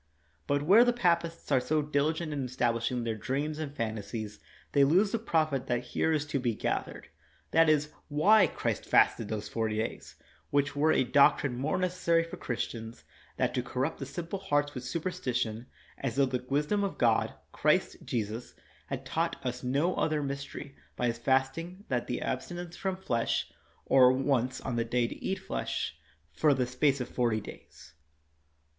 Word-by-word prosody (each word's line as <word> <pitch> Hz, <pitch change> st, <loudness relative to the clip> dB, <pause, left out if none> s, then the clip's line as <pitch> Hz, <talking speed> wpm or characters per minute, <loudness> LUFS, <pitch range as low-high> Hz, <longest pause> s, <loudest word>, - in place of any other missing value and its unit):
' 75 Hz, -1 st, -38 dB
' 75 Hz, -, -40 dB
But 145 Hz, 0 st, +1 dB
where 200 Hz, +9 st, +7 dB
the 245 Hz, 0 st, +3 dB
papists 170 Hz, -8 st, 0 dB
are 135 Hz, -, +5 dB
so 150 Hz, +4 st, 0 dB
diligent 155 Hz, +2 st, 0 dB
in 135 Hz, -3 st, -2 dB
estab 120 Hz, -1 st, +1 dB
lishing 120 Hz, +1 st, -1 dB
their 115 Hz, -1 st, -1 dB
dreams 140 Hz, +7 st, -2 dB
and 155 Hz, -3 st, -4 dB
fantasies, 110 Hz, -3 st, -4 dB, 0.3 s
they 140 Hz, -, +5 dB
lose 185 Hz, +9 st, +4 dB
the 230 Hz, -, 0 dB
profit 155 Hz, -, 0 dB
that 120 Hz, 0 st, 0 dB
here 160 Hz, -, +2 dB
is 150 Hz, -2 st, +1 dB
to 145 Hz, -1 st, -1 dB
be 120 Hz, -3 st, 0 dB
gathered -, -, -3 dB, 0.2 s
— -, -, -35 dB
that 165 Hz, 0 st, +5 dB
is, 150 Hz, 0 st, +2 dB, 0.2 s
why 195 Hz, +9 st, +5 dB
Christ -, -, -2 dB
fasted 110 Hz, -, +3 dB
those 105 Hz, -1 st, -4 dB
forty 110 Hz, -2 st, -1 dB
days; 110 Hz, +1 st, -4 dB, 0.3 s
which 145 Hz, 0 st, +1 dB
were 155 Hz, +2 st, +3 dB
a -, -, +3 dB
doctrine 140 Hz, 0 st, +4 dB
more 140 Hz, +8 st, -1 dB
necessary 180 Hz, -2 st, +2 dB
for 165 Hz, -, -8 dB
Christians 115 Hz, -5 st, -5 dB, 0.3 s
that -, -, +1 dB
to 125 Hz, -, 0 dB
corrupt 130 Hz, +5 st, -2 dB
the 135 Hz, -, -5 dB
simple 170 Hz, +7 st, -5 dB
hearts 145 Hz, -6 st, 0 dB
with 125 Hz, -, -6 dB
superstition, 125 Hz, -7 st, -2 dB, 0.3 s
as 120 Hz, -4 st, -2 dB
tho 140 Hz, -, +4 dB
the 125 Hz, -1 st, -2 dB
wisdom 150 Hz, +9 st, +1 dB
of 200 Hz, -, -2 dB
God, 115 Hz, -2 st, +2 dB, 0.2 s
Christ -, -, +2 dB
Jesus, 115 Hz, 0 st, -4 dB, 0.3 s
had -, -, -5 dB
taught -, -, -1 dB
us 125 Hz, 0 st, -2 dB
no 140 Hz, +8 st, +1 dB
other 155 Hz, -3 st, 0 dB
mystery 140 Hz, 0 st, -6 dB, 0.2 s
by 125 Hz, -, -1 dB
His 115 Hz, -1 st, -1 dB
fasting 135 Hz, -, 0 dB
that 125 Hz, -2 st, -1 dB
the 125 Hz, -, -2 dB
absti 130 Hz, +7 st, -3 dB
nence 175 Hz, -1 st, -6 dB
from 190 Hz, +1 st, -3 dB
flesh, 120 Hz, -11 st, -1 dB, 0.3 s
or 125 Hz, -1 st, +6 dB
once 130 Hz, -1 st, 0 dB
on 125 Hz, -3 st, -3 dB
the 115 Hz, -, +2 dB
day 120 Hz, +1 st, +1 dB
to -, -, -9 dB
eat 190 Hz, -, -1 dB
flesh, 190 Hz, -, -3 dB, 0.4 s
for 145 Hz, -, +3 dB
the 130 Hz, -1 st, +1 dB
space 130 Hz, +2 st, +1 dB
of 125 Hz, -, -3 dB
forty 120 Hz, -3 st, 0 dB
days. 100 Hz, -, -12 dB
140 Hz, 185 wpm, -30 LUFS, 120-160 Hz, 0.4 s, where